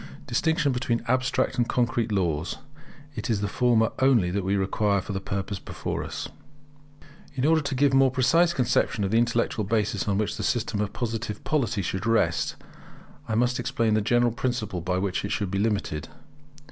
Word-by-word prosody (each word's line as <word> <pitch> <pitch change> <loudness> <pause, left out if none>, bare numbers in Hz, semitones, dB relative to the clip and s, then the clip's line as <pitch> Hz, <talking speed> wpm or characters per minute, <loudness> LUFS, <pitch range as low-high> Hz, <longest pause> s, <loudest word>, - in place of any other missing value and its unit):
[Distinction 160 -3 +1
between 125 -2 -1
Abstract 130 0 +1
and 120 - +1
Concrete 115 -2 0
laws. 85 -5 -1 0.6
It 140 - -5
is 110 -3 +1
the 105 - 0
former 115 +1 +2
only 120 -10 +3
that 100 +1 -1
we 95 +2 0
require 100 +1 +1
for 100 - -6
the 95 - -3
purpose 100 +1 -4
before - - -4
us] - - -5 1.1
In 130 0 0
order 160 +1 +4
to 140 -2 -3
give 140 +1 +3
a - - +5
more 135 0 +5
precise 140 +7 +3
conception 125 -6 +1
of 95 - -1
the 115 - +4
intellectual 120 -1 0
basis 105 0 0
on 100 -1 +1
which 105 0 -1
the - - -4
system 110 -3 0
of 105 - -2
Positive 115 -3 -4
Polity 120 -9 0
should 95 +5 -3
rest, 90 -8 +1 0.7
I 110 - 0
must 125 +2 +1
explain 115 -3 0
the 110 - +3
general 120 +2 +2
principle 110 -6 -2
by 90 +2 -1
which 95 0 -1
it 100 - -3
should 100 -3 -1
be 100 - -1
limited. 100 -9 -1
115 Hz, 185 wpm, -26 LUFS, 100-125 Hz, 1.1 s, a